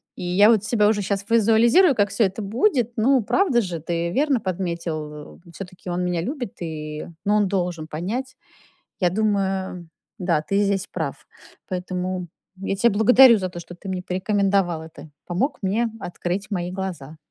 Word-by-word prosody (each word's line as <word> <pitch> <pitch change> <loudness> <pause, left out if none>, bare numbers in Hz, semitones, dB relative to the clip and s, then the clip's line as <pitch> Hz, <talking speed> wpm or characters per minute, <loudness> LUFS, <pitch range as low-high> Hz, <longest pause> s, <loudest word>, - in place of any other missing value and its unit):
И - - -7
я 190 +5 +5
вот 220 -4 +4
себя 215 -1 +2
уже 210 -1 +2
щас 200 0 -2
визуализирую, 230 - +5
как 205 -1 +2
всё 200 +3 +1
это 195 +2 -1
будет. 240 - +1
Ну, 255 +3 +4
правда 285 - +2
же, 180 -4 -4
ты 170 +1 -2
верно 280 0 +2
подметил. 170 -6 -4
В - - -16
всё-таки 185 0 -9
он 175 +1 -1
меня 180 -2 -1
любит, 250 - -4
и 155 -2 -5 0.2
но 205 +1 +3
он 205 -2 +3
должен 175 -4 -2
понять. 230 - -4 0.7
Я 180 -2 +3
думаю, 190 -4 -1 0.3
да, 170 -5 +1
ты 195 +6 0
здесь 200 -1 0
прав, - - -5 0.4
поэтому 180 0 -3 0.3
я 195 0 -2
тя 235 +4 +4
благодарю 235 +3 +7
за 185 -2 -2
то, 175 -1 -8
что 175 - -11
ты 195 - -11
мне 185 -1 -3
порекомендовал 190 -2 0
это, 160 -1 -12 0.2
помог 225 - -1
мне 220 +5 +1
открыть 180 +2 -4
мои 180 -3 -2
глаза. 175 -6 -6
190 Hz, 170 wpm, -23 LUFS, 175-215 Hz, 0.7 s, благодарю